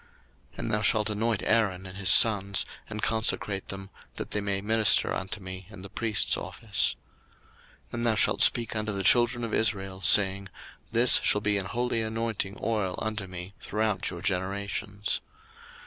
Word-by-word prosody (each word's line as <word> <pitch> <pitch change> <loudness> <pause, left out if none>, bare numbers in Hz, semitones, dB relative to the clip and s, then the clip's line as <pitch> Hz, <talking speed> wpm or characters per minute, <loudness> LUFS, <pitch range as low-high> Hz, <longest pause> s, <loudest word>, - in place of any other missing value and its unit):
02:030:030 - - -22
And - - -4
thou 105 - 0
shalt 105 +1 +2
anoint 110 0 -1
Aaron 100 -5 0
and 95 0 -9
his 100 -1 0
sons, 100 -2 +4 0.2
and 105 0 -6
consecrate 110 -3 -1
them, 95 0 -7 0.2
that - - -7
they 105 - -1
may 100 -1 -2
minister 110 +1 +3
unto 95 +3 -5
me 95 -1 -9
in 100 -3 -12
the 100 - -11
priest's 110 -2 +1
office. 105 -4 -2 0.9
02:030:031 - - -28
And 120 0 -3
thou 110 - +2
shalt - - +1
speak 115 -2 +4
unto 110 0 -2
the 100 -1 -4
children 120 +3 +3
of 115 - -4
Israel, 95 -3 -1
saying, 95 +1 +4 0.4
This 120 +2 +6
shall 105 - +2
be 105 -1 0
an 95 - -4
holy 120 0 -2
anointing 110 -3 -3
oil 105 -5 -1
unto 110 -3 -4
me 90 +1 -8
throughout 105 -3 -2
your 85 - -8
generations. 100 +1 -3
105 Hz, 170 wpm, -27 LUFS, 95-110 Hz, 0.9 s, This